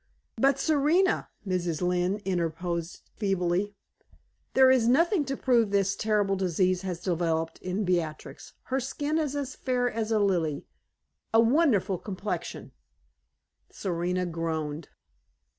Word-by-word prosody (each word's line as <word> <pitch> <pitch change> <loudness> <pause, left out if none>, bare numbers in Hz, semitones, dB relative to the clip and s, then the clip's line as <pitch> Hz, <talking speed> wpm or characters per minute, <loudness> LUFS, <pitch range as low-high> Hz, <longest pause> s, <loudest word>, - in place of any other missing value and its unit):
"But, 275 +3 +3
Serena," 315 +6 +2 0.2
Mrs. 175 -4 -1
Lynne 180 +3 0
interposes, 170 -1 -2
feebly, 195 0 0 0.8
"there 260 0 +7
is 250 -3 +3
nothing 330 - +3
to 270 0 -3
prove 235 -5 +3
that 200 - +2
this 195 -1 +1
terrible 210 -3 +1
disease 185 0 +1
has 180 -3 -4
developed 165 -2 -1
in 185 +3 -2
Beatrix. 170 -4 -3
Her 265 +1 -1
skin 290 +4 -2
is 295 -3 -1
as 280 -2 -3
fair 250 -1 0
as 225 0 -3
a 220 - +3
lily 175 -8 0 0.7
a - - +7
wonderful 225 - +3
complexion 200 0 -5 0.5
" - - -51
Serena 180 0 -1
groaned. 160 -2 -3
195 Hz, 125 wpm, -28 LUFS, 175-250 Hz, 0.8 s, there